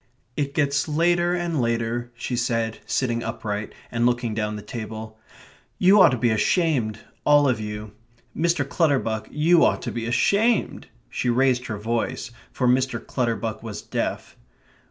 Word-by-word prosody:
"It 140 -1 -2
gets 140 -1 +1
later 175 +3 +2
and 170 -5 -1
later," 115 +1 -1
she 120 +1 -3
said, 115 -2 -1
sitting 120 -3 0
upright, 105 -2 -4 0.2
and 120 0 0
looking 120 -2 0
down 105 -1 -2
the 105 - -7
table. 110 -1 -7 0.6
"You 195 +2 +6
ought - - +8
to 130 - -1
be 120 0 +2
ashamed 120 - +1 0.3
all 145 -1 +5
of 125 -4 +1
you. 105 0 -6 0.4
Mr. 160 -4 +1
Clutterbuck, 135 -9 0
you 165 +3 +4
ought - - +2
to - - -3
be 115 -1 -4
ashamed." 205 - +1 0.2
She 125 - -2
raised 125 0 +2
her 110 - -4
voice, 115 +3 -2 0.2
for 125 - 0
Mr. 125 -1 +2
Clutterbuck 115 -3 -2
was 110 -3 -7
deaf. - - -3
120 Hz, 155 wpm, -24 LUFS, 110-145 Hz, 0.6 s, ought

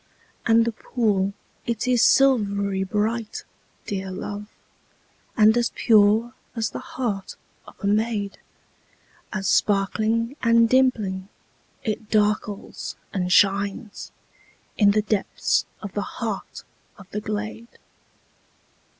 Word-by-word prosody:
And 230 0 +5
the 235 - 0
pool, 210 -4 0 0.4
it 235 0 -1
is 250 -2 +3
silvery 200 -7 +3
bright, 215 +3 -2 0.4
dear 195 -1 -4
love, 205 +2 -6 0.9
And 215 0 +6
as 240 -1 +2
pure 220 +2 +4 0.2
as 225 -1 -1
the - - -5
heart 245 - -4 0.3
of - - -13
a - - -4
maid, 210 -1 0 0.9
As 200 -2 -2
sparkling 220 +5 +1
and 230 -1 +5
dimpling, 215 -7 +1 0.5
it 215 -1 -3
darkles 210 -1 -1 0.2
and 180 -2 -1
shines 200 +2 +1 0.6
In 205 -2 +5
the 210 +1 +3
depths 210 -2 0 0.2
of 200 -2 -6
the 205 - -1
heart 215 0 -5 0.3
of 200 -3 -14
the 210 - -3
glade. 215 +2 -5
210 Hz, 110 wpm, -24 LUFS, 200-230 Hz, 0.9 s, And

